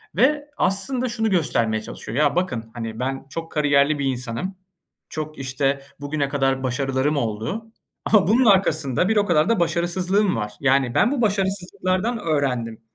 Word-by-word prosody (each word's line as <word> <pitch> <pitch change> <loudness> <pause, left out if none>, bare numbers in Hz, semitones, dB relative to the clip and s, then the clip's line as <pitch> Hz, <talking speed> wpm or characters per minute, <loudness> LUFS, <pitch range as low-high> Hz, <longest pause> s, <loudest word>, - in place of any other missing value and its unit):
ve 290 - +3
aslında 245 +7 +1
şunu 225 -1 -1
göstermeye 115 - +1
çalışıyor. 110 - -7
Ya, 150 -1 +3
bakın, 120 -11 -2
hani, 115 -1 -6
ben 135 +1 -3
çok 165 +3 -6
kariyerli 145 -1 +2
bir 140 - -1
insanım, 130 +8 -3 0.5
çok, 155 0 -6
işte, 135 +1 -1 0.2
bugüne 145 0 -2
kadar 135 -2 0
başarılarım 135 +3 0
oldu 115 - -3 0.4
ama 210 -3 +4
bunun 240 +6 +4
arkasında 180 - +3
bir 220 - +2
o 205 - +3
kadar 170 0 +2
da 230 -4 +2
başarısızlığım 180 +3 +1
var. 105 -2 -3
Yani 135 -2 +2
ben 240 - +4
bu 280 -4 -1
başarısızlıklardan 195 +1 0
öğrendim 125 - -1
150 Hz, 155 wpm, -22 LUFS, 130-195 Hz, 0.5 s, ama